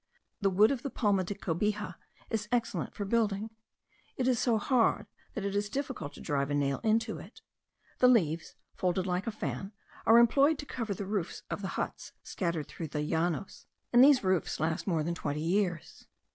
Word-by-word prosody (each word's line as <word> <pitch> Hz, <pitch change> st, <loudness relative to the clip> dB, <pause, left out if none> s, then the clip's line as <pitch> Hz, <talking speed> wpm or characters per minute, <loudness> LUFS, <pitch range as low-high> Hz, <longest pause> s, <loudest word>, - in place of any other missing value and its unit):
The 200 Hz, -, +3 dB
wood 205 Hz, +5 st, +5 dB
of 265 Hz, -4 st, -2 dB
the 275 Hz, -, -3 dB
palma 205 Hz, -7 st, +1 dB
de 200 Hz, +3 st, -4 dB
cobija 205 Hz, +2 st, -1 dB, 0.4 s
is 215 Hz, -2 st, -1 dB
excellent 230 Hz, -8 st, -1 dB
for 205 Hz, -, -3 dB
building. 215 Hz, 0 st, 0 dB, 0.7 s
It 255 Hz, -, 0 dB
is 250 Hz, -3 st, +3 dB
so 235 Hz, -3 st, +2 dB
hard, 235 Hz, +1 st, +2 dB, 0.3 s
that 200 Hz, -, -3 dB
it 200 Hz, 0 st, -2 dB
is 205 Hz, 0 st, 0 dB
difficult 220 Hz, -, -4 dB
to -, -, -11 dB
drive 140 Hz, -1 st, -1 dB
a 145 Hz, -, 0 dB
nail 140 Hz, -1 st, 0 dB
into 225 Hz, 0 st, +1 dB
it. -, -, -13 dB, 0.6 s
The 250 Hz, -, +6 dB
leaves, 165 Hz, -10 st, +2 dB, 0.2 s
folded 180 Hz, 0 st, 0 dB
like 180 Hz, +3 st, -1 dB
a -, -, 0 dB
fan, 195 Hz, -, -5 dB, 0.3 s
are 225 Hz, +2 st, +8 dB
employed 275 Hz, +6 st, +5 dB
to 290 Hz, -, -6 dB
cover 225 Hz, -7 st, -3 dB
the 200 Hz, -, -5 dB
roofs 195 Hz, -3 st, -3 dB
of -, -, -3 dB
the 195 Hz, -, -3 dB
huts -, -, -4 dB
scattered 170 Hz, -5 st, -2 dB
through 165 Hz, -, -6 dB
the 150 Hz, 0 st, -3 dB
Llanos; 170 Hz, +3 st, -2 dB, 0.3 s
and 240 Hz, +1 st, +8 dB
these 275 Hz, -4 st, +6 dB
roofs 185 Hz, -3 st, 0 dB
last 160 Hz, +4 st, -1 dB
more 165 Hz, -5 st, +1 dB
than 170 Hz, +2 st, -1 dB
twenty 150 Hz, -3 st, -3 dB
years. 175 Hz, -1 st, -1 dB
200 Hz, 190 wpm, -30 LUFS, 170-225 Hz, 0.7 s, are